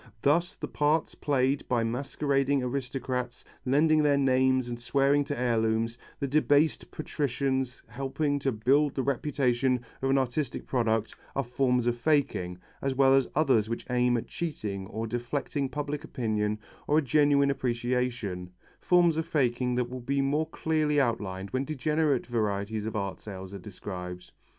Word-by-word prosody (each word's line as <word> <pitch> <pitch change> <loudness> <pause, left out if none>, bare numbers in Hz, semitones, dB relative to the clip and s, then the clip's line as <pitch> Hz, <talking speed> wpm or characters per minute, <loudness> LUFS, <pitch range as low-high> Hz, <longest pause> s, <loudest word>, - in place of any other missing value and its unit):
Thus 165 +5 +2
the - - -5
parts 150 +2 +1
played 135 -1 0
by 120 -2 +2
masquerading 135 +3 0
aristocrats, 125 -1 -3 0.2
lending 155 +4 +4
their 145 -1 +3
names 130 -1 +3
and 120 -1 -5
swearing 140 +3 +2
to 145 - -3
heirlooms, 115 -1 +1 0.2
the 140 - -1
debased 150 +2 +2
patricians 135 -3 -2
helping 135 +4 -2
to 135 -1 0
build 135 +6 +2
the 135 - 0
reputation 130 -2 +1 0.2
of 135 - 0
an 135 - +4
artistic 130 +1 -1
product, 115 -3 0 0.2
are 135 - +1
forms 125 0 +1
of 120 0 +2
faking, 125 - +1 0.2
as 135 -1 -1
well 135 0 +5
as 135 -2 +4
others 130 -8 +3
which 115 - -4
aim 125 0 +3
at 115 - -3
cheating 105 - -4
or 110 +1 -4
deflecting 130 +4 -2
public 145 +1 -4
opinion 105 -7 -1 0.3
or 150 - +3
a 155 - +3
genuine 140 -1 +4
appreciation 120 -7 -2 0.3
forms 175 -3 +4
of 160 0 -1
faking 125 -5 +1
that 125 -1 0
will 130 0 -5
be 140 +3 -1
more 145 +3 +1
clearly 155 -2 +1
outlined 100 -7 -1
when 130 +1 0
degenerate 150 -1 0
varieties 105 -2 -1
of 110 - -4
art 100 -2 -3
sales 95 -2 -8
are 100 - -6
described. 90 -2 -7
130 Hz, 155 wpm, -28 LUFS, 115-145 Hz, 0.3 s, well